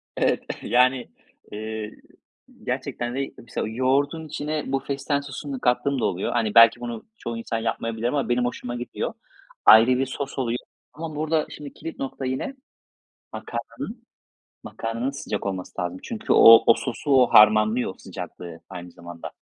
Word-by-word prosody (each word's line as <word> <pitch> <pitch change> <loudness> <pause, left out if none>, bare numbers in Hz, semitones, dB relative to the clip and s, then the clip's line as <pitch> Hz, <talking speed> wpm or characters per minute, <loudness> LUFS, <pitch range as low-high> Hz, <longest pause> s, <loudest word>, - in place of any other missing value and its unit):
Evet, - - +1 0.2
yani, 125 -3 +2 0.4
eee, 110 0 -5 0.7
gerçekten 120 0 -3
de, 135 0 -3
mesela, 115 -2 -5
yoğurdun 135 +7 0
içine 150 0 -3
bu 135 - +1
fesleğen 140 +1 -2
sosunu 140 0 -6
kattığım 125 +3 +1
da - - +1
oluyor. 90 +2 -1
Hani, 115 -3 0
belki 115 0 +8
bunu 120 -2 -6
çoğu 115 -1 -5
insan 115 0 -3
yapmayabilir 115 0 -2
ama 140 0 -1
benim 120 0 +2
hoşuma 120 0 -4
gidiyor. 120 0 -4 0.5
Ayrı 110 +2 +9
bir 135 - +1
sos 135 +1 -5
oluyor 120 -2 0 0.4
ama 155 0 -6
burada, 155 0 0
şimdi 145 -2 -9
kilit 165 - -8
nokta 135 0 -4
yine, 130 - -3 0.8
makarnanın, - - -6 0.6
makarnanın 115 +3 -3
sıcak 120 -8 -5
olması 95 -1 -4
lazım. 90 +1 -4
Çünkü 225 -1 -1
o, 115 0 +9
o 115 - +9
sosu, 125 +5 -4
o 130 -2 +6
harmanlıyor 110 +1 +5
sıcaklığı 85 -2 -9
aynı 90 0 -8
zamanda. 85 -1 -9
120 Hz, 150 wpm, -24 LUFS, 110-140 Hz, 0.8 s, Ayrı